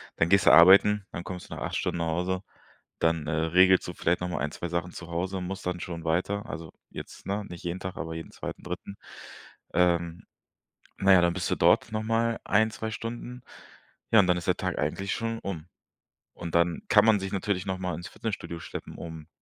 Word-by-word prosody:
dann 85 Hz, -, +1 dB
gehst 100 Hz, 0 st, +4 dB
du -, -, +8 dB
arbeiten, 100 Hz, +3 st, +7 dB
dann 85 Hz, -, -5 dB
kommst 90 Hz, -1 st, -7 dB
du -, -, -6 dB
nach -, -, -8 dB
8 -, -, -3 dB
Stunden -, -, -1 dB
nach 85 Hz, -, 0 dB
Hause, 90 Hz, +3 st, -1 dB, 0.6 s
dann, 80 Hz, -2 st, +1 dB
äh, -, -, -1 dB
regelst 90 Hz, +4 st, +4 dB
du 90 Hz, -, -5 dB
vielleicht 85 Hz, +1 st, 0 dB
noch 90 Hz, -, -2 dB
mal 85 Hz, -, -3 dB
1, 75 Hz, +1 st, -2 dB
2 85 Hz, -, -5 dB
Sachen 85 Hz, +1 st, -2 dB
zu 85 Hz, -, -8 dB
Hause 90 Hz, +3 st, -2 dB
und 90 Hz, -1 st, -4 dB
musst 95 Hz, 0 st, -6 dB
dann 90 Hz, -1 st, -2 dB
schon 85 Hz, -2 st, -6 dB
weiter. 95 Hz, +6 st, 0 dB
Also, 80 Hz, +1 st, -7 dB, 0.2 s
jetzt -, -, -10 dB
ne, 100 Hz, +2 st, -2 dB
nicht 85 Hz, -1 st, -10 dB
jeden 85 Hz, +2 st, -3 dB
Tag, 95 Hz, -1 st, -6 dB
aber 80 Hz, 0 st, -4 dB
jeden 80 Hz, -, -7 dB
2., -, -, -7 dB
3.. 90 Hz, +3 st, -6 dB, 0.8 s
Ähm, 85 Hz, -1 st, +1 dB, 0.7 s
na 95 Hz, 0 st, +5 dB
ja, 90 Hz, -, +7 dB
dann 85 Hz, 0 st, +2 dB
bist 90 Hz, -1 st, -2 dB
du -, -, +3 dB
dort 115 Hz, -, +3 dB
nochmal 115 Hz, +1 st, 0 dB
1, 110 Hz, +1 st, +3 dB
2 110 Hz, 0 st, -5 dB
Stunden. 120 Hz, +3 st, -6 dB, 0.7 s
Ja, 110 Hz, -, +7 dB
und 95 Hz, -, +5 dB
dann 90 Hz, 0 st, +3 dB
ist 85 Hz, -, -6 dB
der -, -, +2 dB
Tag -, -, -2 dB
eigentlich 95 Hz, +7 st, -1 dB
schon 115 Hz, 0 st, -3 dB
um. 85 Hz, -4 st, -5 dB, 0.7 s
Und 85 Hz, -1 st, -7 dB
dann 85 Hz, 0 st, +2 dB
kann -, -, +6 dB
man 105 Hz, -3 st, +5 dB
sich 95 Hz, 0 st, -4 dB
natürlich 95 Hz, -1 st, -1 dB
nochmal 95 Hz, -2 st, -2 dB
ins 85 Hz, 0 st, -7 dB
Fitnessstudio 100 Hz, -6 st, -5 dB
schleppen, -, -, -8 dB
um 80 Hz, -2 st, -8 dB
90 Hz, 215 wpm, -27 LUFS, 85-100 Hz, 0.8 s, du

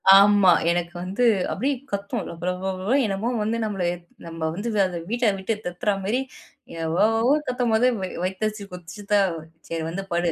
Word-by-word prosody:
ஆமா. 200 Hz, -1 st, +8 dB, 0.2 s
எனக்கு 175 Hz, 0 st, 0 dB
வந்து 195 Hz, +7 st, -1 dB, 0.3 s
அப்டியே 270 Hz, +7 st, 0 dB, 0.2 s
கத்தும். 200 Hz, +3 st, -2 dB
லபலப 185 Hz, +4 st, -2 dB
என்னமோ 205 Hz, +3 st, -1 dB
வந்து 220 Hz, +2 st, 0 dB
நம்மள 200 Hz, -4 st, -2 dB, 0.4 s
நம்ம 165 Hz, -1 st, -3 dB
வந்து 210 Hz, +6 st, -3 dB, 0.2 s
அத 175 Hz, -2 st, -4 dB
வீட்ட 240 Hz, +1 st, +1 dB
விட்டு 190 Hz, +4 st, -1 dB
தொறத்துற 180 Hz, +4 st, 0 dB
மாரி 235 Hz, +6 st, +1 dB, 0.6 s
எவ்வளோவோ 225 Hz, -, +3 dB
கத்தும்போது, 245 Hz, -1 st, +2 dB
வ -, -, -3 dB, 0.2 s
வயித்த 190 Hz, +3 st, -2 dB
அடிச்சு 215 Hz, -1 st, -6 dB
கொதிச்சிதான். 195 Hz, +1 st, 0 dB, 0.3 s
சரி 165 Hz, -1 st, -2 dB
வந்து 185 Hz, +4 st, -4 dB
படு. 175 Hz, 0 st, +1 dB
195 Hz, 145 wpm, -24 LUFS, 180-220 Hz, 0.6 s, ஆமா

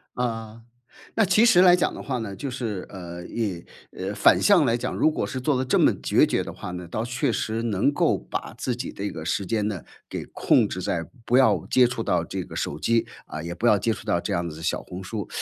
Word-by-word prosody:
嗯， 115 Hz, -2 st, -3 dB, 0.5 s
那 220 Hz, -, +4 dB
其 195 Hz, +4 st, +4 dB
实 180 Hz, -6 st, +6 dB
来 180 Hz, -1 st, +8 dB
讲 180 Hz, -, 0 dB
的 -, -, -7 dB
话 130 Hz, -3 st, -3 dB
呢， 110 Hz, -4 st, -5 dB
就 140 Hz, -, -5 dB
是， 115 Hz, -7 st, -4 dB
呃， 85 Hz, -2 st, -8 dB
你 95 Hz, -5 st, -3 dB, 0.5 s
反 -, -, +5 dB
向 190 Hz, -7 st, +5 dB
来 115 Hz, -2 st, +2 dB
讲， -, -, -3 dB
如 155 Hz, -, +3 dB
果 -, -, -2 dB
是 130 Hz, -1 st, -4 dB
做 140 Hz, 0 st, +1 dB
得 130 Hz, -, -1 dB
这 125 Hz, -, +2 dB
么 -, -, +5 dB
决 -, -, +4 dB
绝 -, -, 0 dB
的 -, -, -6 dB
话 90 Hz, -, -7 dB
呢， 90 Hz, -1 st, -7 dB
倒 110 Hz, +6 st, -3 dB
确 125 Hz, +3 st, -1 dB
实 110 Hz, +1 st, -2 dB
能 115 Hz, +4 st, +1 dB
够 -, -, +2 dB
把 -, -, -6 dB
自 125 Hz, -, -1 dB
己 125 Hz, -, -5 dB
的 100 Hz, -, -6 dB
一 100 Hz, -, -1 dB
个 80 Hz, -1 st, -7 dB
时 95 Hz, +4 st, -1 dB
间 105 Hz, +1 st, 0 dB
呢， 100 Hz, -5 st, -3 dB, 0.3 s
给 -, -, -4 dB
控 -, -, +2 dB
制 -, -, -4 dB
在 85 Hz, -, -2 dB, 0.2 s
不 120 Hz, -, +2 dB
要 110 Hz, -, +4 dB
接 125 Hz, -1 st, +5 dB
触 120 Hz, -1 st, -2 dB
到 90 Hz, -6 st, +1 dB
这 95 Hz, +1 st, -4 dB
个 -, -, -11 dB
手 -, -, -3 dB
机， 115 Hz, 0 st, +2 dB, 0.2 s
啊， 80 Hz, -, -6 dB
也 85 Hz, -, -4 dB
不 110 Hz, +7 st, 0 dB
要 105 Hz, -, +6 dB
接 115 Hz, +3 st, 0 dB
触 110 Hz, -, -6 dB
到 95 Hz, -5 st, +1 dB
这 105 Hz, -, -4 dB
样 85 Hz, -2 st, -1 dB
子 80 Hz, +1 st, -9 dB
小 -, -, -1 dB
红 90 Hz, +1 st, -8 dB
书。 105 Hz, 0 st, -5 dB
110 Hz, 270 characters per minute, -25 LUFS, 90-125 Hz, 0.5 s, 来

